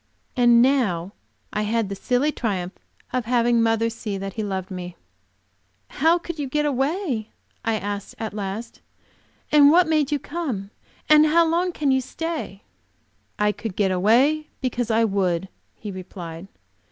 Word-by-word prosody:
And 240 -1 +6
now 205 -10 +1 0.4
I 210 - 0
had 220 0 0
the 200 - -5
silly 250 +8 +1
triumph 190 -9 -2 0.4
of 255 -2 -1
having 240 0 +3
mother 225 0 +2
see 220 -3 -4
that 195 0 -5
he 220 - -3
loved 190 -2 -4
me! 180 -1 -6 0.9
"How 325 +5 +3
could 340 -2 -7
you 285 - -2
get 300 +2 0
away?" 275 - -1 0.3
I 225 - +1
asked 205 -1 -5
at 220 -2 -5
last. 210 +3 -5 0.7
"And 290 -1 +7
what 345 +2 +5
made 305 -3 +1
you 295 - +2
come? 270 - -4 0.4
And 305 0 +7
how 335 +2 +4
long 345 +3 +1
can 295 -5 0
you 265 0 +3
stay?" 310 - -5 0.7
"I 210 0 +2
could 210 -2 -6
get 195 -2 +1
away 250 +12 +3
because 245 -2 -2
I 225 +1 +3
would," 190 -4 0 0.3
he 210 - -7
replied. 180 -2 -8
230 Hz, 155 wpm, -23 LUFS, 200-290 Hz, 0.9 s, And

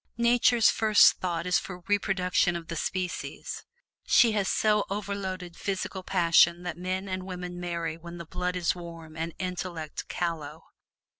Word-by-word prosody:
Nature's 235 -1 +4
first 215 -2 +5
thought 170 -2 -2
is 180 0 +3
for 180 -2 -8
reproduction 185 -2 +1
of 170 -1 -6
the 170 - -3
species; 180 +2 -4 0.4
she 235 - +6
has 205 -3 0
so 210 -1 +2
overloaded 195 -3 -4
physical 190 0 -3
passion 175 -1 +4
that 175 - -4
men 185 +2 -3
and 185 0 -3
women 180 -1 -6
marry 170 -2 -3
when 170 +1 -9
the 170 - -7
blood 180 +2 -3
is 175 -2 +1
warm 165 -3 -10
and 165 +1 -4
intellect 180 -4 -5
callow. 160 -3 -4
180 Hz, 150 wpm, -28 LUFS, 170-195 Hz, 0.4 s, she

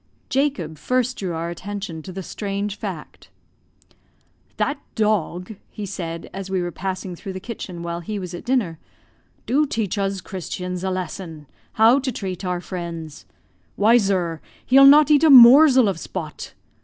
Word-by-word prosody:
Jacob 255 - -1
first 255 0 -1
drew 185 -3 -3
our 165 +1 -3
attention 185 -2 -6
to 185 - -9
the 190 +1 -6
strange 200 +1 -4
fact. - - -8 1.3
"That 290 -1 -1 0.2
dog," 210 -2 -1
he 210 - -7
said, 170 -3 -6
as 195 0 -6
we 190 -1 0
were 175 -1 -3
passing 185 0 -5
through 190 +3 -8
the 185 - -6
kitchen 185 -5 -7
while 170 0 -4
he 205 +5 -5
was 180 -2 -6
at 175 - -7
dinner, 235 -11 -1 0.7
"do 290 +4 +2
teach 215 -5 -2
uz 195 0 -1
Christians 180 0 -6
a 190 - -1
lesson 180 -4 -5 0.3
how 225 +5 +5
to 265 -1 -2
treat 190 -5 -5
our 180 -1 -2
friends. 165 - -7 0.5
Why, 225 +4 +5
zur, 180 -6 -1 0.2
he'll 270 +2 +7
not 295 +1 +7
eat 295 +1 +5
a 320 - +6
morzel 260 0 +8
of 190 -4 -2
Spot. 165 -4 -7
195 Hz, 160 wpm, -22 LUFS, 175-230 Hz, 1.3 s, morzel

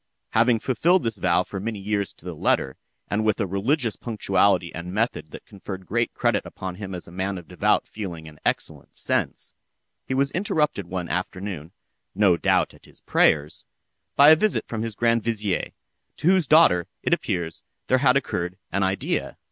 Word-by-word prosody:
Having 115 +1 +4
fulfilled 170 +8 +2
this 115 -3 -2
vow 90 0 +3
for 95 - -6
many 110 +2 -3
years 100 -2 -2
to - - -19
the - - -4
letter, 65 - 0 0.3
and 105 +2 0
with 110 -2 +1
a 105 - +1
religious 110 - 0
punctuality 100 -5 +1
and 85 +2 -6
method 105 -5 -1
that - - -11
conferred 95 -1 -8
great - - 0
credit - - +1
upon 95 -1 -6
him 95 0 -6
as 90 - -8
a - - -12
man 95 +2 -2
of 85 -3 -10
devout - - +1
feeling 85 -7 -7
and 75 -1 -13
excellent - - -2
sense, - - -1 0.5
he 130 - -1
was 140 +1 +2
interrupted 150 - 0
one 90 -1 -4
afternoon 90 -3 -4 0.4
(no 100 -3 +4
doubt 80 - +1
at - - -19
his - - -16
prayers) 75 +1 +2 0.5
by 145 +2 +8
a - - +9
visit 210 +6 0
from 110 -2 -4
his 115 -2 -4
grand 115 +1 +2
vizier, 105 -4 -1 0.5
to - - -7
whose 185 -4 +4
daughter, 140 - +5 0.2
it - - +2
appears, 80 -2 -2 0.2
there 130 - +3
had 130 0 +4
occurred 90 -9 -3
an 100 - 0
idea. 95 0 -1
100 Hz, 180 wpm, -24 LUFS, 90-115 Hz, 0.5 s, a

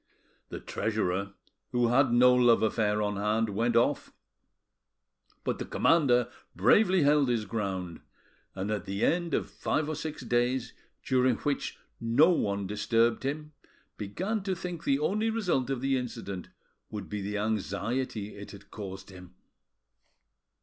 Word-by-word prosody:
The - - -6
treasurer, 100 -2 -2 0.4
who 120 -1 +2
had 130 +1 +4
no 125 +1 +6
love 120 -2 +4
affair 105 -1 +1
on 105 -1 -1
hand, 105 +2 +1
went 115 +4 0
off; 115 - +2 1.3
but - - -2
the - - -3
commander 125 -7 +3 0.3
bravely 190 -5 +4
held 145 -2 +4
his 115 -3 0
ground, 95 -5 -4 0.5
and 100 +2 -3
at 105 -3 -2
the 100 +2 -1
end 170 -3 +1
of - - -1
five 155 -1 -1
or 155 - -2
six 155 -2 -5
days, 120 +1 0 0.3
during 130 -2 +2
which 145 +4 -2 0.2
no 120 +9 +4
one 100 - 0
disturbed 115 +3 +1
him, 150 +3 -4 0.4
began 185 - -3
to 190 -1 -2
think 175 -1 -6
the 135 - +3
only 210 +9 0
result 180 - 0
of 135 -3 -2
the 135 0 +1
incident 115 -7 -6 0.4
would 105 -4 -6
be 105 +5 -4
the 105 +1 -3
anxiety 110 +1 -2
it 100 0 -9
had 100 -1 -13
caused 95 -2 -8
him. 90 -1 -13
120 Hz, 145 wpm, -29 LUFS, 105-140 Hz, 1.3 s, no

